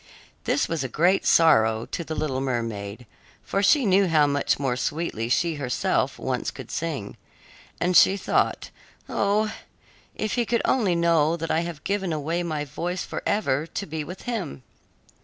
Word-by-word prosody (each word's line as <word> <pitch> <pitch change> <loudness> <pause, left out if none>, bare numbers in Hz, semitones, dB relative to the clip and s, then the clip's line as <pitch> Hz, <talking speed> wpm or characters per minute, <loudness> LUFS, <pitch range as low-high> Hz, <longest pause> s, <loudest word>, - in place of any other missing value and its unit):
This - - +1
was 165 -4 -2
a - - -2
great 180 +8 +2
sorrow 110 -9 +4
to 170 - -4
the 160 -1 -5
little 135 -4 -2
mermaid, 115 -4 -3 0.4
for 195 - -1
she 270 +6 +4
knew 195 0 +4
how 155 -3 +4
much 145 0 +1
more 135 -3 -1
sweetly 125 -4 -2
she 165 +4 +1
herself 125 -3 0
once - - -2
could - - -10
sing, 150 -11 -4 0.6
and 180 +1 +1
she 195 +3 +6
thought, 190 - 0 0.4
"Oh, 210 +2 +1 0.6
if 215 - -2
he 240 - +1
could 235 - +1
only 205 -9 +2
know 170 -1 +3
that 165 0 -3
I 160 - +2
have 170 -3 -5
given 195 -3 -1
away 160 +3 -1
my 155 -4 -3
voice 175 +5 -4
forever, 155 -8 -1
to 200 - -5
be 155 -2 -4
with 180 +5 -9
him!" 195 - -4
165 Hz, 165 wpm, -25 LUFS, 140-185 Hz, 0.6 s, she